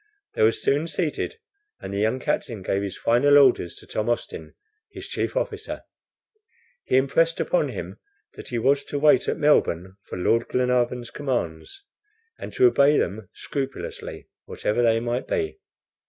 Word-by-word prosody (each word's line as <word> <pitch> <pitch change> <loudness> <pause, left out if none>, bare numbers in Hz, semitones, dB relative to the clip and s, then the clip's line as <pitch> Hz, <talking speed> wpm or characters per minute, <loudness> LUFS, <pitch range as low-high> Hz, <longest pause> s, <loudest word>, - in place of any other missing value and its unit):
They - - -3
were 110 +1 +6
soon 145 +7 0
seated, 170 - -2 0.4
and 100 - -7
the 100 - -2
young 110 +5 +1
captain 115 -4 -2
gave 95 +1 0
his 100 -2 -5
final 140 +5 +4
orders 125 -11 +4
to - - -12
Tom 110 +2 -2
Austin, 80 -9 -4 0.4
his 380 0 -9
chief - - -2
officer. 435 -3 -3 1.0
He - - +2
impressed 165 +5 +2
upon - - +1
him - - -7 0.3
that - - -11
he 120 - -3
was 140 +4 +2
to 145 - -4
wait 150 +1 +4
at - - 0
Melbourne 95 - +2
for - - -7
Lord 115 +6 +1
Glenarvan's 125 -1 0
commands, 130 - -4 0.6
and - - -7
to 385 - +4
obey 150 - +5
them 100 +2 -2
scrupulously, 135 -1 -6 0.2
whatever 110 +3 -1
they 115 -1 +3
might 120 +2 -2
be. 405 -1 -2
125 Hz, 155 wpm, -24 LUFS, 110-150 Hz, 1.0 s, were